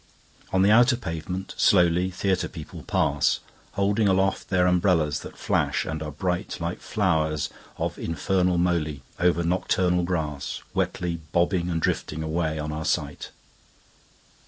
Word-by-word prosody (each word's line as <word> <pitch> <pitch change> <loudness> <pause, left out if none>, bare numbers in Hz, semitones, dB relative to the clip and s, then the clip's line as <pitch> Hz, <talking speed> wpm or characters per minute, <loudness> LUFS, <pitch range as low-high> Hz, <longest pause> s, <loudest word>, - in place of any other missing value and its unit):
On 95 0 +3
the 100 - +5
outer 120 +3 +6
pavement, 90 -2 -5
slowly, 90 -1 +4
Theatre 95 +1 0
people 80 -4 -9
pass, 70 0 +1 0.3
Holding 100 +2 +2
aloft 95 0 +1
their 90 -1 +3
umbrellas 90 -4 +2
that - - -10
flash - - 0
and 80 -1 -4
are 75 -1 -4
brightLike 90 +1 -3
flowers 80 -7 0 0.3
of - - -3
infernal 90 +2 +1
molyOver 85 0 0
nocturnal 90 0 +1
grassWetly 85 +1 -2
bobbing 90 0 +1
and 85 -1 0
drifting 80 0 -1
away 80 0 -1
on 75 0 -3
our 80 +1 -4
sight. - - -2
90 Hz, 125 wpm, -25 LUFS, 80-95 Hz, 0.3 s, outer